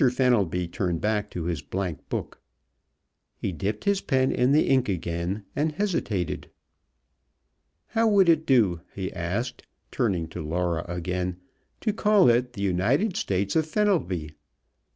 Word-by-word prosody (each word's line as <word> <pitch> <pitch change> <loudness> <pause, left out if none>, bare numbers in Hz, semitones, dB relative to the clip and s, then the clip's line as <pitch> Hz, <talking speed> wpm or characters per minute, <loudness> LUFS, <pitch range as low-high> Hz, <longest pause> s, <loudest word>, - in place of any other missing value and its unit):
Fenelby 110 -9 +1
turned 85 -1 -2
back 105 +1 0
to 85 - -5
his 85 -4 -2
blankbook. 90 +3 -4 1.0
He - - -2
dipped 100 +5 -3
his 200 -1 +2
pen 130 -2 +2
in 125 +2 +2
the 150 +2 +4
ink 130 -4 +3
again, 90 +2 -2
and 155 +2 0
hesitated. 145 - -2 1.4
"How 225 0 +2
would 200 -4 +5
it 160 -1 +3
do," 105 -11 +3
he 95 -2 -4
asked, 100 +9 -3 0.2
turning 95 -10 0
to - - -6
Laura 85 +1 -1
again, 90 +1 -3 0.4
"to 215 - 0
call 210 - +4
it 125 +1 +1
the 100 -4 -4
'United 120 - +1
States 100 +1 -1
of 160 -1 +2
Fenelby?' 155 - 0
105 Hz, 135 wpm, -26 LUFS, 90-140 Hz, 1.4 s, would